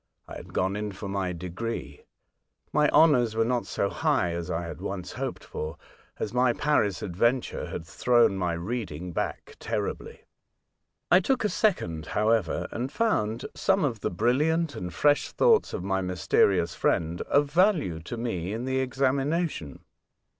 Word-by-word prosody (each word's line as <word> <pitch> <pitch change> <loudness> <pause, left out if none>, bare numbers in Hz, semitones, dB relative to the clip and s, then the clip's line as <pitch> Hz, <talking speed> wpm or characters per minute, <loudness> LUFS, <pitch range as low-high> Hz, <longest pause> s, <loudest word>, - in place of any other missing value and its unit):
I - - -9
had - - -10
gone 95 +2 0
in 105 -1 -3
for 100 +2 -7
my 95 -2 -2
degree. 90 -3 -5 0.7
My 150 0 +4
honours 125 -8 +4
were 115 0 +2
not 125 0 -1
so 100 - 0
high 135 - +1
as 85 -1 -4
I 85 +1 -2
had 85 +1 -7
once 95 -2 -5
hoped - - -5
for, 75 0 -6 0.4
as 105 - -4
my 125 -1 +3
Paris 115 -9 +1
adventure 115 +8 0
had 80 - -6
thrown 120 +2 +3
my 90 -3 -1
reading 90 -2 -4
back - - -4
terribly. - - -4 0.9
I 180 - +8
took 245 +7 0
a 210 - +2
second, 85 - 0
however, 105 -4 +1
and 125 +4 -3
found 120 - 0
some 195 -3 +2
of 120 -6 -2
the - - -1
brilliant 145 - +1
and 90 -5 -5
fresh 145 - +2
thoughts 460 -3 +3
of - - -4
my 95 0 0
mysterious 90 -1 +2
friend 85 +1 0
of 145 0 +3
value 165 - +2
to 85 +9 -7
me 100 -6 -3
in 115 +3 -3
the 130 0 0
examination. 135 - -1
115 Hz, 160 wpm, -27 LUFS, 90-140 Hz, 0.9 s, I